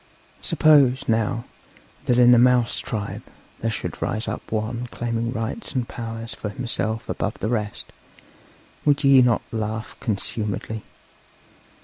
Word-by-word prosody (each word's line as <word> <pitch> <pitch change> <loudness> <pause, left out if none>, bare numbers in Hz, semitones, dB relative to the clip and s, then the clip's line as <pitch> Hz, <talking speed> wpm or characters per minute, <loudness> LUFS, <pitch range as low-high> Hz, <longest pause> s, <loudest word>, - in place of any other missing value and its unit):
Suppose, 140 -3 +4
now, 115 +1 +1 0.6
that 120 - +3
in 125 0 +7
the 120 - +7
mouse 125 -1 +4
tribe 105 -3 -4 0.4
there 115 - -1
should 110 - -4
rise 110 +1 -2
up - - -5
one 115 +3 -2
claiming 115 0 -2
rights 115 - -4
and 125 -3 -1
powers 115 -1 -6
for 105 - -5
himself 110 -1 -2
above - - -2
the 110 - -2
rest, 105 -3 -2 1.0
would 145 -1 +3
ye 135 -1 +7
not 120 -2 +3
laugh 110 0 -3
consumedly? 110 0 -3
115 Hz, 130 wpm, -23 LUFS, 110-125 Hz, 1.0 s, in